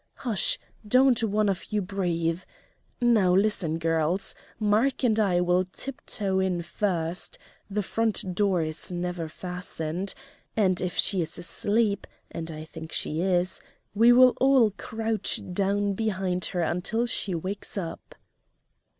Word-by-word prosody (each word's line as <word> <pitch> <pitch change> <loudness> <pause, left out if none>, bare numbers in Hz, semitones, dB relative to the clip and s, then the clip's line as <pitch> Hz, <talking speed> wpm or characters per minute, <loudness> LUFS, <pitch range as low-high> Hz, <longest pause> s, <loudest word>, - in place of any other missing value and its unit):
Hush! 230 -6 +1 0.3
don't 255 +1 +4
one 215 -1 +2
of 195 +1 -2
you 210 - +1
breathe. 175 -3 -1 0.6
Now, 215 -7 +4
listen, 190 -5 +2
girls! 165 +2 0 0.3
Mark 220 +6 +2
and 225 -3 +3
I 185 -4 +3
will 180 +1 +3
tiptoe 195 -1 -3
in 180 -2 0
first 170 -1 -1 0.3
the 205 +1 -1
front 215 -3 -1
door 190 -3 +2
is 155 +3 -3
never 175 -1 -3
fastened 180 +1 -3 0.4
and 185 -4 +3
if 180 -1 -3
she 190 -3 +2
is 160 - -5
asleep 205 +3 0 0.2
and 165 0 -5
I 155 -1 -7
think 160 0 -9
she 155 +2 -1
is 180 0 +1 0.3
we 230 +3 +6
will 250 +1 +7
all 260 -5 +5
crouch 220 +2 -2
down 200 +1 +1
behind 190 -4 -1
her 180 - -2
until 195 +8 0
she 210 -6 -1
wakes 190 +5 -5
up." 170 -4 -6
190 Hz, 135 wpm, -27 LUFS, 175-215 Hz, 0.6 s, will